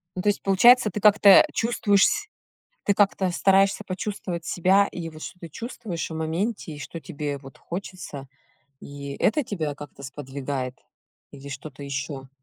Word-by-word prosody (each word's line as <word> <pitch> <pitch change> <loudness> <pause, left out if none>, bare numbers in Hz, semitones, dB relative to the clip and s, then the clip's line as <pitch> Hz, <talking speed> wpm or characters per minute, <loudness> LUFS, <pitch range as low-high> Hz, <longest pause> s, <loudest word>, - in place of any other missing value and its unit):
Ну 185 - -2
то 205 - +2
есть 205 - 0
получается, 215 +4 +6
ты 210 - -4
как-то 205 -1 +7
чувствуешь 205 -3 +3
с 420 0 0 0.6
Ты 200 - +3
как-то 195 -2 +2
стараешься 195 +3 +3
почувствовать 185 -3 -4
себя, 190 +4 +3
и 170 -2 -5
вот 155 -1 -13
что 180 - -8
ты 170 - -9
чувствуешь 220 - -5
в - - -6
моменте, 165 +4 -2
и 145 - -9
что 165 - -7
тебе 150 -4 -4
вот 135 -1 -14
хочется, 175 -6 -7 0.5
и 140 0 -7
это 295 +7 +2
тебя 160 -10 -3
как-то 145 -1 -11
сподвигает? 135 -1 -5 0.6
Или 140 0 -10
что-то 140 +1 -8
ещё? 135 -1 -5
170 Hz, 160 wpm, -25 LUFS, 145-200 Hz, 0.6 s, как-то